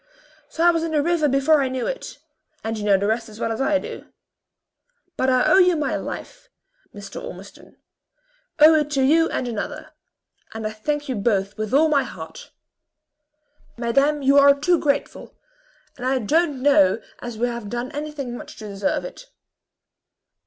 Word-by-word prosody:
So 330 - -1
I 345 - +7
was 330 -1 -1
in 330 -1 -3
the 295 -2 +2
river 335 -2 +1
before 275 +3 +3
I 270 - +1
knew 255 -1 -3
it - - -5 0.5
and 225 0 -3
you 215 - -5
know 200 -2 +4
the 200 - -2
rest 225 +2 -1
as 215 0 -13
well 230 - -1
as 225 - -3
I 290 +2 +2
do. - - -8 1.1
But 260 - 0
I 255 -1 +3
owe 380 - +5
you 360 -2 +5
my 300 -2 -1
life, - - -7 0.4
Mr. 200 -1 -9
Ormiston 190 +3 -11 0.8
owe 310 +2 +8
it 300 -2 +1
to 270 -2 +2
you 325 +4 +4
and 250 - -3
another; 225 -4 -5 0.6
and 220 -1 -5
I 215 - -2
thank 290 +7 -3
you 260 - -2
both 200 -2 0
with 215 0 -4
all 300 +4 +4
my 295 -3 +3
heart." - - -9 1.3
"Madame, 275 +5 +1
you 275 +1 +5
are 280 0 +6
too 345 +3 +2
grateful; 285 -1 -2 0.6
and 245 - -9
I 265 0 +2
don't 285 +3 0
know 210 -8 +4 0.2
as 240 -2 -7
we 240 +2 0
have 235 -3 -5
done 240 +2 -4
anything 290 -4 -5
much - - -10
to 215 - -8
deserve 200 - -2
it." - - -10
270 Hz, 180 wpm, -22 LUFS, 225-300 Hz, 1.3 s, owe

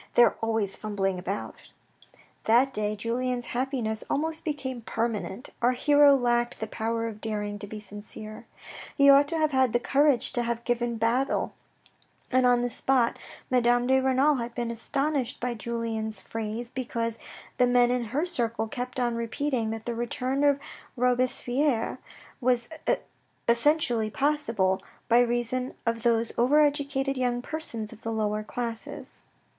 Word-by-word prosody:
They 240 - +8
are 230 - +4
always 220 -3 +1
fumbling 195 -3 -2
about." 190 +3 -4 0.9
That 250 +4 +4
day 210 0 -1
Julien's 245 +3 -2
happiness 240 -4 -1
almost 315 +2 -1
became 270 -5 -3
permanent. 225 +1 -3
Our 245 +1 +4
hero 290 +2 +6
lacked 240 -2 +1
the 220 - -2
power 225 +1 -2
of 220 -2 -6
daring 210 -2 -3
to 205 - -6
be 215 +1 -7
sincere. 215 +2 -9 0.5
He 280 0 +8
ought 280 +1 +6
to 330 +2 -1
have 310 -1 +2
had 260 -3 +3
the 240 - +3
courage 275 0 +2
to 240 - +1
have 235 0 -2
given 240 -1 0
battle, 235 +4 +1 0.8
and 255 -1 +4
on 245 -1 +4
the 245 - 0
spot; 250 -1 +1 0.3
Madame 245 -1 +3
de 265 +1 +4
Renal 265 +2 +3
had 235 -1 -5
been 235 -1 -2
astonished 275 +2 -1
by 245 0 -1
Julien's 225 -1 -3
phrase, 225 +2 -5
because 230 -3 -3 0.4
the 250 - +5
men 245 0 +4
in 250 -1 0
her 280 +9 -1
circle 230 -9 -1
kept 250 +3 -4
on 240 -1 +1
repeating 235 0 -1
that 225 0 -5
the 240 - -2
return 255 +4 -1
of 285 -1 +4 0.4
Robespierre 250 +1 +1 0.4
was 245 -1 +2 0.8
essentialy 235 -3 +2
possible 230 -10 +1 0.3
by 235 +1 +5
reason 245 +1 0
of 230 0 0
those 230 -1 +2
over 265 +6 +5
educated 280 -2 +1
young 245 -1 0
persons 235 -9 -5
of 225 - -15
the 225 - -3
lower 215 -1 0
classes. 230 +1 -6
240 Hz, 150 wpm, -27 LUFS, 225-260 Hz, 0.9 s, They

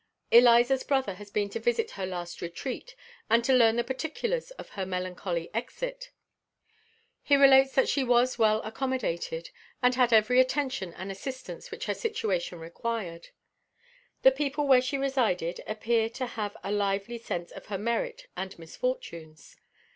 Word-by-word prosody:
Eliza's 240 +2 +6
brother 265 -7 0
has 205 +2 -12
been 205 0 0
to - - -4
visit 460 -2 0
her 190 - -4
last 175 -2 -6
retreat, 255 - -6 0.3
and 235 +1 +4
to 265 - +3
learn 230 -3 +5
the 240 - +1
particulars 320 - -3
of - - -10
her 195 - -4
melancholy 180 -2 -3
exit. - - -4 1.1
He 285 - +4
relates 270 -1 +6
that 265 - +4
she 275 - +1
was 245 0 +2
well 215 -1 +3
accommodated, 220 -9 -3 0.3
and 250 0 +3
had 250 -1 +3
every 230 +3 +5
attention 255 -8 0
and 190 +2 -6
assistance 260 - -7
which 445 - -6
her - - 0
situation 205 - -2
required. 170 0 -5 0.9
The 265 - +8
people 285 +1 -1
where 260 -2 +6
she 260 +2 -2
resided 245 -11 0
appear 225 +1 0
to 255 +3 -4
have 215 -4 -5
a 200 - -3
lively 205 +3 -1
sense 175 -6 -5
of - - -11
her 200 - -3
merit 445 - -2
and 190 0 -5
misfortunes. 165 - -6
235 Hz, 155 wpm, -28 LUFS, 195-270 Hz, 1.1 s, The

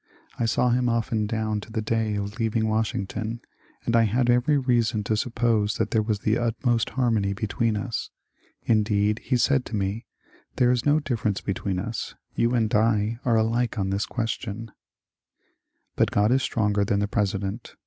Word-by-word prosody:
I 115 - +1
saw 125 +2 +2
him 125 0 +2
often 115 -2 0
down 110 -1 -1
to 110 - -12
the 110 - -2
day 110 -1 0
of 100 0 -3
leav 110 -1 -1
ing 110 -1 +2
Washington, 110 +1 -2 0.5
and 115 - +1
I 115 -1 +5
had 120 +3 +2
every 125 +5 +3
reason 120 -5 +1
to 110 +2 0
suppose 110 -2 +1
that - - -1
there 110 - +3
was 105 -1 -2
the 110 +2 +1
utmost 120 0 0
harmony 110 -6 +2
between 110 +2 -1
us. 115 +3 -3 0.5
Indeed, 105 -1 +2
he 130 - 0
said 135 +1 +2
to - - -5
me, 100 +3 -2 0.5
^^ - - -40
There 125 -1 +4
is 125 +2 0
no 145 +1 +5
diifference 115 -8 -2
between 100 -1 -2
us. 115 +5 -4 0.2
You 120 +1 +1
and 110 -3 +1
I 110 +1 +2
are 120 -2 +3
alike 115 +2 0
on 95 -1 -1
this 100 +2 -1
question." 115 -2 -4 1.2
But - - +2
God 105 +2 +2
is 135 +1 +3
stronger 105 -4 +1
than 100 0 +1
the 105 - 0
President. 100 +1 -2
110 Hz, 180 wpm, -25 LUFS, 105-120 Hz, 1.2 s, I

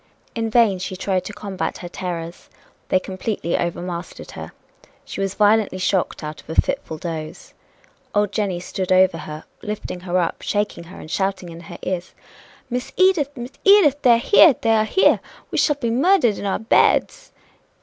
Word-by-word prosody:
In 225 -1 -2
vain 220 -5 +3
she 185 0 -5
tried 185 0 -1
to - - -5
combat 200 -2 -4
her 175 - -8
terrors 175 -1 -6 0.4
they 185 - +3
completely 190 -2 -3
overmastered 175 0 -4
her. - - -8 0.5
She - - -6
was 195 0 -2
violently 210 -2 +3
shocked 185 -2 -1
out 150 0 -6
of - - -26
a 160 - 0
fitful 160 - -1
doze. 155 -1 -7 0.6
Old 205 -1 +2
Jenny 200 -4 -1
stood 185 +1 -4
over 185 -2 +4
her, 155 0 -8 0.2
lifting 210 -4 -5
her 180 0 -2
up, 175 - -1
shaking 205 -4 -2
her, 185 - -12
and 155 - -10
shouting 190 -1 -2
in 165 0 -10
her 165 - -10
ears: 180 -1 -4 0.5
"Miss 250 0 -4
Edith! 370 -7 +4
Miss 245 +2 -6
Edith! 355 -9 +5
They 245 -3 +6
are - - +5
here! 295 - +6
They 225 -1 +2
are 215 -1 +3
here! 380 - +3 0.3
We - - 0
shall 295 - +3
be 235 -5 -2
murdered 260 - +3
in 205 - -3
our 195 - 0
beds!" 225 - +2
195 Hz, 180 wpm, -21 LUFS, 180-230 Hz, 0.6 s, They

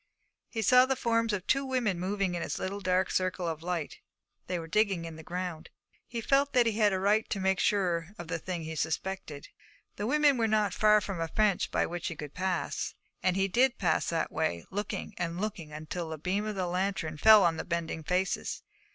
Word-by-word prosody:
He 225 -2 -3
saw 250 +4 +6
the 265 - +1
forms 230 -2 +1
of 200 -2 -2
two 275 +1 +2
women 245 -9 0
moving 195 0 -1
in 175 - -2
its - - -3
little 200 +2 -4 0.3
circle 185 -1 -1
of 160 -1 -3
light; 170 -3 -3 0.5
they 180 - -1
were 165 - -5
digging 195 -1 +1
in 165 -1 -7
the 160 - -9
ground. 175 -1 -5 0.4
He 235 -1 -4
felt 275 +4 +2
that 250 -2 +5
he 230 - +2
had 210 -1 +3
a 190 - 0
right 205 +3 +2
to 200 - -2
make 190 0 +1
sure 175 -4 +1
of 175 - -7
the 165 0 -2
thing 175 -1 -4
he 160 0 -5
suspected. 160 0 -3 0.5
The 205 - -2
women 290 0 +4
were 225 - +3
not 210 -3 +2
far 210 +1 +5
from 190 -5 -4
a 165 - 0
fence 210 +2 +2
by - - 0
which 175 0 -4
he 165 - -4
could 150 -1 -8
pass, 185 -1 -2 0.3
and 185 -1 +2
he 195 0 +2
did 245 +6 +3
pass 175 -5 +1
that 165 - -1
way, 85 - -1
looking 205 +2 -4
and 170 0 -2
looking 155 -7 -5
till 170 -3 -3
a 160 - -4
beam 190 +7 -1
of 215 - -3
the 185 -1 -1
lantern 180 -3 -2
fell 215 +5 +8
full - - +4
on 165 -1 +2
the - - -3
bending 170 -2 -3
faces. 180 +4 -1
185 Hz, 220 wpm, -30 LUFS, 170-215 Hz, 0.5 s, fell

